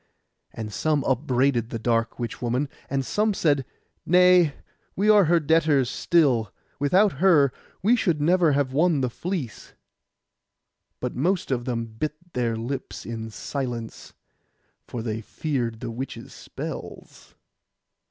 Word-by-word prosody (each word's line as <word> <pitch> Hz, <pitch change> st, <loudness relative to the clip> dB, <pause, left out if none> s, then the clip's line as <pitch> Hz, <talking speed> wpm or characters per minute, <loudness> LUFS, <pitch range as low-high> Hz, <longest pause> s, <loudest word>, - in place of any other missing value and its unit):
And 110 Hz, -2 st, -7 dB
some 150 Hz, +1 st, +1 dB
upbraided 130 Hz, -2 st, +1 dB
the 115 Hz, -, -3 dB
dark 115 Hz, 0 st, 0 dB
witch 120 Hz, -2 st, -5 dB
woman, 125 Hz, +4 st, -1 dB, 0.2 s
and 135 Hz, -1 st, -1 dB
some 210 Hz, -, +1 dB
said, 145 Hz, -7 st, +1 dB, 0.4 s
'Nay, 180 Hz, -3 st, +5 dB, 0.4 s
we 210 Hz, +3 st, +4 dB
are 205 Hz, -3 st, +6 dB
her 170 Hz, +2 st, +4 dB
debtors 150 Hz, -4 st, +2 dB
still; 130 Hz, -, +2 dB, 0.3 s
without 185 Hz, +9 st, +4 dB
her 150 Hz, -9 st, +5 dB, 0.3 s
we 225 Hz, +5 st, +5 dB
should 175 Hz, -10 st, +1 dB
never 165 Hz, 0 st, +3 dB
have 135 Hz, -2 st, 0 dB
won 160 Hz, 0 st, +3 dB
the 125 Hz, -2 st, -1 dB
fleece.' 165 Hz, -, -5 dB, 1.3 s
But 125 Hz, -, -4 dB
most 175 Hz, +4 st, 0 dB
of 120 Hz, -2 st, -1 dB
them 120 Hz, -3 st, -2 dB
bit 115 Hz, +7 st, -4 dB, 0.2 s
their 120 Hz, -2 st, 0 dB
lips 125 Hz, +4 st, -5 dB
in 115 Hz, -1 st, -5 dB
silence, 120 Hz, -1 st, -5 dB, 0.7 s
for 115 Hz, -, -5 dB
they 110 Hz, -1 st, -3 dB
feared 120 Hz, -3 st, -3 dB
the 120 Hz, -2 st, -4 dB
witch's 130 Hz, +4 st, -7 dB
spells. -, -, -9 dB
135 Hz, 135 wpm, -25 LUFS, 120-165 Hz, 1.3 s, are